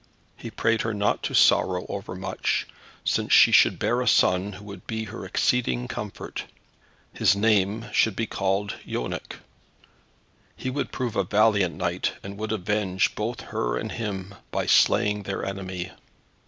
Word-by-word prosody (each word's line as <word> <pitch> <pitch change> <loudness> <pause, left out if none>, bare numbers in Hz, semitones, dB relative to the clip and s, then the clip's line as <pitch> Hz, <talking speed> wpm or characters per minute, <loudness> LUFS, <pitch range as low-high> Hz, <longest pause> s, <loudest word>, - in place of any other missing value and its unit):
He - - -8
prayed 115 0 +1
her 110 -1 -2
not 100 0 +1
to - - -2
sorrow 90 -1 +4
overmuch, 95 -1 -3 0.4
since - - 0
she - - +8
should - - +5
bear 120 +1 +1
a 125 - -2
son 95 -1 +3
who 100 +2 -11
would 100 -3 -10
be 110 0 -3
her 110 -1 -7
exceeding 125 +4 +1
comfort. 105 -4 -6 0.7
His 100 - +3
name 105 +1 +2
should 110 -3 +3
be 115 - -1
called 100 0 -1
Yonec. 60 - -4 1.2
He 130 - -4
would 140 +2 -3
prove 125 -4 -3
a 100 - +2
valiant 100 -2 +2
knight, 90 -1 -1
and 100 0 -7
would 110 0 -3
avenge 105 -2 0
both 115 +3 -3
her - - -2
and - - -4
him 100 -4 -4 0.2
by - - -2
slaying 105 0 +4
their 100 0 -4
enemy. 95 -2 -5
100 Hz, 155 wpm, -25 LUFS, 95-110 Hz, 1.2 s, she